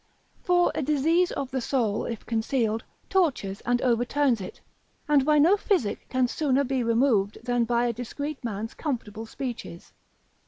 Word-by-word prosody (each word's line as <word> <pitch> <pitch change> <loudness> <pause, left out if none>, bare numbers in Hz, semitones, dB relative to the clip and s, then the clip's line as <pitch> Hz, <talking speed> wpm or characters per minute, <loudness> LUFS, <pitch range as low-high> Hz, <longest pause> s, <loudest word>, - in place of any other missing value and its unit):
For 355 -1 +3
a - - -2
disease 310 +5 +2
of 275 -2 -4
the 260 0 -1
soul, 230 -5 0
if 230 -3 -5
concealed, 225 -1 0 0.2
tortures 265 - 0
and 245 0 +2
overturns 245 0 +2
it, 185 - -8 0.5
and 290 -2 +4
by 300 +2 +3
no 330 +7 +6
physic 370 - -1
can 255 -1 +2
sooner 280 0 +1
be 265 -1 -1
removed 230 -3 +2
than 245 -1 +1
by 240 +1 +1
a 240 - 0
discreet 280 +5 -5
man's 220 -1 -4
comfortable 225 -7 -4
speeches. 240 -9 -7
250 Hz, 155 wpm, -26 LUFS, 225-285 Hz, 0.5 s, no